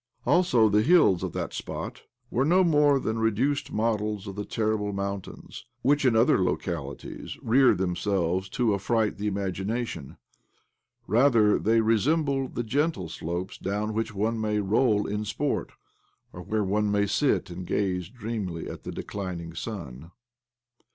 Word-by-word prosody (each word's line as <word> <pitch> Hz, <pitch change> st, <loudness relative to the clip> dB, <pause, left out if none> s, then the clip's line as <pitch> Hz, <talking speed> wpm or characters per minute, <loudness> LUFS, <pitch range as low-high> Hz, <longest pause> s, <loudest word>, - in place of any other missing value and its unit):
Also 150 Hz, -11 st, +4 dB
the 105 Hz, 0 st, +3 dB
hills 125 Hz, -, +5 dB
of -, -, -3 dB
that -, -, -4 dB
spot -, -, -6 dB, 0.3 s
were 130 Hz, -, +1 dB
no 180 Hz, +6 st, +4 dB
more 150 Hz, -4 st, +4 dB
than 110 Hz, -2 st, -2 dB
reduced 115 Hz, +6 st, 0 dB
models 105 Hz, -2 st, -1 dB
of 100 Hz, -2 st, -7 dB
the 105 Hz, 0 st, -4 dB
terrible 110 Hz, -2 st, -1 dB
mountains 100 Hz, -1 st, -6 dB, 0.2 s
whic)i, 145 Hz, +1 st, +3 dB
in 125 Hz, -3 st, +4 dB
other 110 Hz, -4 st, +4 dB
localities, -, -, -4 dB
rear 125 Hz, +3 st, +5 dB
themselves 95 Hz, 0 st, -1 dB
to 120 Hz, -4 st, +1 dB
affright 105 Hz, +2 st, 0 dB
the 105 Hz, -, -2 dB
imagination. 100 Hz, -, -3 dB, 0.9 s
Rather, 115 Hz, -2 st, +4 dB
they 115 Hz, +1 st, +3 dB
resembled 135 Hz, +4 st, +1 dB
the 120 Hz, -, -1 dB
gentle 130 Hz, -, -1 dB
slopes 85 Hz, +4 st, -5 dB
down 105 Hz, +3 st, -2 dB
which 115 Hz, +1 st, -2 dB
one 110 Hz, +2 st, -1 dB
may 105 Hz, -1 st, 0 dB
roll 105 Hz, +1 st, +2 dB
in 105 Hz, +1 st, -2 dB
sport, 135 Hz, +7 st, -2 dB, 0.6 s
or 90 Hz, -, -8 dB
where 105 Hz, +5 st, -1 dB
one 105 Hz, +2 st, +1 dB
may 100 Hz, 0 st, +2 dB
sit 105 Hz, 0 st, +1 dB
and 90 Hz, +1 st, -7 dB
gaze 90 Hz, -2 st, -1 dB
dreamily 105 Hz, -7 st, -5 dB
at -, -, -7 dB
the -, -, -6 dB
declining 90 Hz, -4 st, -5 dB
sun. 85 Hz, -, -7 dB
105 Hz, 145 wpm, -27 LUFS, 95-120 Hz, 0.9 s, hills